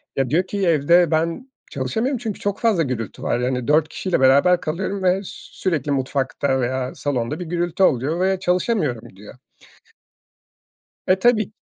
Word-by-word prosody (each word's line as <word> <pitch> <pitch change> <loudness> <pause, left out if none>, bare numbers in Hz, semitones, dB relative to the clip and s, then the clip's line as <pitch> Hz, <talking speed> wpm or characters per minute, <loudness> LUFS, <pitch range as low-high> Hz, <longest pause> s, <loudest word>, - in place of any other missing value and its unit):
Ya, 135 -2 0
diyor 165 +7 +2
ki 195 -1 -1
"Evde 170 +2 +4
ben 165 +11 -1 0.2
çalışamıyorum 220 - -2
çünkü 225 -4 -5
çok 200 -1 -3
fazla 215 -8 +2
gürültü 120 - -5
var." 120 - 0
Yani, 125 -1 -2
"4 155 +1 +3
kişiyle 180 +3 -2
beraber 140 +7 +4
kalıyorum 190 +5 -3
ve 185 +1 +2
sürekli 165 -6 -4
mutfakta 135 0 -1
veya 130 +1 -2
salonda 145 +1 -2
bir 180 - -5
gürültü 175 +2 -1
oluyor 145 +1 +1
ve 190 0 +1
çalışamıyorum." 180 - -1
diyor. 105 +5 -13 1.7
E, 185 +1 +3
tabii. 220 -1 +2
165 Hz, 150 wpm, -21 LUFS, 130-190 Hz, 1.7 s, Evde